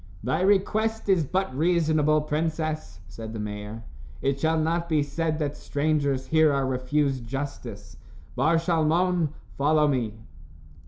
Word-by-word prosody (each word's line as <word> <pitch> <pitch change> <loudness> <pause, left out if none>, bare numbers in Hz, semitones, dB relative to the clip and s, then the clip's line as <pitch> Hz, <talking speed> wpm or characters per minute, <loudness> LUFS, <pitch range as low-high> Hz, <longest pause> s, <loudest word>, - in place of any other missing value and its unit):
"Thy 130 +9 0
request 210 +3 +1
is 185 -4 +4
but 190 -6 -1
reasonable, 155 -1 +2
princess," 155 - -2
said 110 +4 -8
the 110 - -5
mayor. 105 +1 -6 0.4
"It 140 0 +1
shall 160 +1 +2
not 170 +2 0
be 155 -2 +3
said 155 +1 -2
that 150 -2 -2
strangers 140 -3 0
here 155 +2 +4
are 140 -1 +1
refused 130 0 0
justice. 135 +3 -6 0.4
Bar 165 +2 +3
Shalmon, 165 0 +2 0.3
follow 150 +1 +4
me." 120 -7 -1
155 Hz, 130 wpm, -26 LUFS, 135-165 Hz, 0.4 s, is